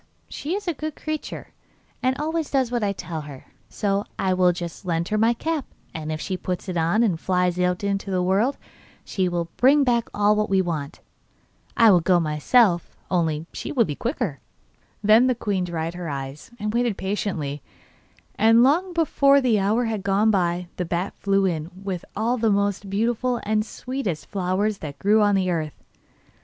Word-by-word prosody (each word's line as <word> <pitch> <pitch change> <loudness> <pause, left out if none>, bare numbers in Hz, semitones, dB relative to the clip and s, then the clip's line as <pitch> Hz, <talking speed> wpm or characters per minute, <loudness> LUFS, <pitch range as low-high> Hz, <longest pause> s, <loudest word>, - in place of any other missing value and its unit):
She 320 +6 -4
is 410 -1 -5
a 345 - +1
good 310 0 -5
creature, 310 -1 -5 0.5
and 255 +1 +1
always 315 +1 -2
does 265 -4 +1
what 240 -1 0
I 200 - +1
tell 170 -4 -5
her, 145 -3 -10 0.2
so 200 -1 -1
I 190 -1 +1
will 180 -1 +4
just 175 0 -6
lend 170 -2 -1
her 215 - 0
my 230 +2 +3
cap, 315 +3 -2 0.3
and 155 -1 -5
if 155 - -3
she 185 +3 -3
puts 180 +1 -4
it 185 - -3
on, 170 +7 +2
and 185 -8 +1
flies 180 -1 0
into 195 +2 0
the 185 -1 0
world, 200 +9 +1 0.5
she 185 -2 0
will 170 -1 -3
bring 280 +3 +5
back 235 -3 +1
all 210 +1 +2
we 195 -1 +2
want. 160 -5 -3 0.8
I 230 -2 +7
would 175 -3 +4
go 180 0 +4
myself, 170 - +2
only 160 -3 0
she - - -5
will 250 -7 +3
be 150 - -3
quicker.' 230 - -3 0.6
Then 220 +4 +6
the 255 - +2
queen 200 -5 -1
dried 165 -1 -3
her 175 -2 -5
eyes, 135 +1 -6
and 210 +1 -2
waited 235 -3 +1
patiently, 180 -8 -3 0.7
and 225 +2 +5
long 345 +8 +2
before 280 -4 +4
the 240 -6 +2
hour 215 +5 +1
had 220 -3 -2
gone 200 +3 +2
by 175 -2 0
the 180 - -1
bat 175 +3 -2
flew 195 0 +2
in 165 -3 -1
with 190 -2 -5
all 230 +4 0
the 225 0 +2
most 200 -1 0
beautiful 235 +4 0
and 215 0 +1
sweetest 225 - -4
flowers 195 +2 -1
that 145 -2 -7
grew 210 +8 +3
on 205 -1 +4
the 185 -1 +1
earth. 155 -3 -4
200 Hz, 185 wpm, -24 LUFS, 175-235 Hz, 0.8 s, I